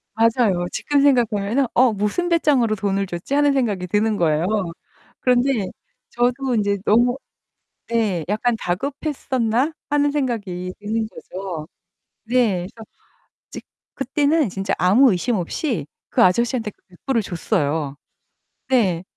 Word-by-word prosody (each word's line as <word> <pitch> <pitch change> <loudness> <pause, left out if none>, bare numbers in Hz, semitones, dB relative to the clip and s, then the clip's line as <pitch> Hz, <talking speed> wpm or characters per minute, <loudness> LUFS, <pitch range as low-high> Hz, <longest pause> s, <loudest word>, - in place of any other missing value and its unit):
맞아요. 225 -6 +2
지금 290 -1 +1
생각하면은 240 -2 +2
'어? 245 -2 +4
무슨 210 - -1
배짱으로 275 -10 +3
돈을 195 -1 -1
줬지?' 175 +8 -5
하는 290 0 +4
생각이 205 -9 0
드는 210 +2 +1
거예요. 160 0 +1 0.8
그런데 250 -5 +2 0.4
저도 245 +1 0
이제 200 0 +1
'너무 245 +4 +3 0.7
'네 215 -8 0
'...약간 225 +3 +1
다급했었나?' 260 - -1 0.2
하는 290 0 +2
생각이 210 -11 -3
드는 220 +1 -2
거죠. 180 -7 -7 0.6
네. 225 -7 +1
그래서 225 -2 -13 0.6
이제 - - -8 0.3
그때는 285 +2 +1
진짜 195 +1 -2
아무 210 +10 +5
의심 220 +6 0
없이 180 - -2 0.2
그 - - +3
아저씨한테 230 +4 +2
그 - - -32
$100 195 +8 -4
을 230 - +3
줬어요. 155 -6 -1 0.7
네. 195 -10 +2
225 Hz, 270 characters per minute, -21 LUFS, 190-260 Hz, 0.8 s, 아무